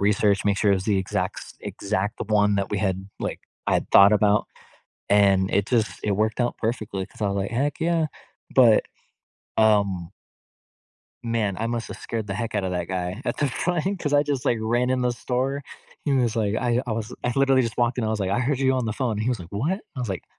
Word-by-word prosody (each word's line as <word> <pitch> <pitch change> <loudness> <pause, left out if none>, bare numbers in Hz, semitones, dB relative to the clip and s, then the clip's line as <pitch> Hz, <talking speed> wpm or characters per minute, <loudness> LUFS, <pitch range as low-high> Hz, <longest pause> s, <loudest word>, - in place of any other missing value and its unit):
research, 100 0 +2
make 100 -1 +2
sure 105 - +3
it 100 - +5
was 95 - -3
the 100 -2 +2
exact 95 - -2
s - - -10
exact 100 0 -3
one 105 -1 +3
that 100 0 -1
we 105 - -1
had 95 -1 -2
like, - - -4 0.3
I - - +2
had - - -1
thought 100 +1 +8
about, 105 0 +3 0.6
and 100 -2 +4
it 100 +1 +2
just 115 -3 0
it 105 - 0
worked 110 +4 0
out 120 - -1
perfectly 110 -4 -2
'cause - - -16
I 105 - +2
was 100 - -1
like, 95 0 -2
"Heck 140 +6 -1
yeah." 165 -1 +1 0.5
But, 120 -5 +6 0.7
um 100 -5 +2 1.1
man, 110 -5 0
I 115 - -1
must 115 -1 -3
have - - -8
scared 110 -2 -4
the 95 - -4
heck 115 +2 -3
out 100 - 0
of 95 - -2
that 90 -1 -2
guy 95 +5 -3
at - - -2
the 145 - +1
front 180 +7 -1
'cause 145 -3 -2
I 145 0 +5
just, 140 -4 -2
like, 120 - +2
ran 120 +3 +1
in 130 -1 +1
the 125 -1 +1
store. 130 +3 -2 0.4
He 145 - +1
was 125 -4 +2
like 110 -2 0
I 120 0 +1
I - - -3
was 110 -1 -4
I 120 - 0
literally 135 -1 +4
just 115 -3 -3
walked 120 0 +2
in. - - 0
I - - 0
was 110 -1 -1
like, 95 -1 -1
"I 120 - +1
heard 130 +2 0
you 130 -1 +3
on 130 -3 0
the 110 - -1
phone." 115 -4 -2
He 110 +3 -1
was 125 - 0
like, 85 -1 -10
"What?" 155 - -1 0.2
I - - -3
was 120 - -3
like, 95 -2 -4
110 Hz, 240 wpm, -24 LUFS, 100-125 Hz, 1.1 s, thought